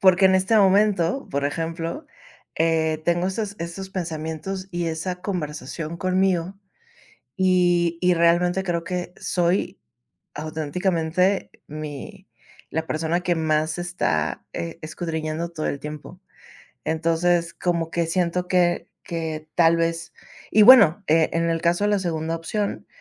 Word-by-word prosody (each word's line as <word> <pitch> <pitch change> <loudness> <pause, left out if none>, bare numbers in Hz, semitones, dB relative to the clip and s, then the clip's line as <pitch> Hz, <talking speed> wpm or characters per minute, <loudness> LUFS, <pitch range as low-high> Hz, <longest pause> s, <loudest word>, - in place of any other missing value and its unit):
Porque, 190 0 +6
en 190 - +4
este 190 +4 +2
momento, 200 +2 +3
por 140 0 -1
ejemplo, 165 - -3 0.5
eh, 160 -1 +1
tengo 175 +2 +1
esos 200 +1 -3
esos 170 +3 -6
pensamientos 170 +2 -4
y 175 -1 -2
esa 165 +3 -3
conversación 155 -3 -4
conmigo, 185 0 +1 0.8
y 175 -2 +3
y 180 0 +4
realmente, 175 +2 +3
creo 170 -3 -1
que 180 +1 -4
soy, 180 +2 0 0.5
auténticamente, 165 +4 0 0.2
mi 155 +6 -8 0.4
la 160 0 -2
persona 160 +3 -1
que 175 -1 +1
más 155 0 0
está, 80 - -1
eh, 85 0 -5
escudriñando 160 0 -4
todo 160 -2 -4
el 140 - -2
tiempo. 150 +5 -8 0.6
Entonces, 165 +1 +1
como 170 -2 -1
que 170 0 0
siento 180 +1 0
que 175 -2 +2 0.2
que, 160 -2 -4
tal 165 -1 +5
vez 165 -1 -1 0.4
Y 215 - +6
bueno, 210 -6 +8
eh, 160 +1 +4
en 165 0 +1
el 165 0 0
caso 175 +3 +2
de 210 - +2
la 205 - +2
segunda 165 -2 -2
opción, 200 +5 -3
170 Hz, 135 wpm, -23 LUFS, 160-185 Hz, 0.8 s, bueno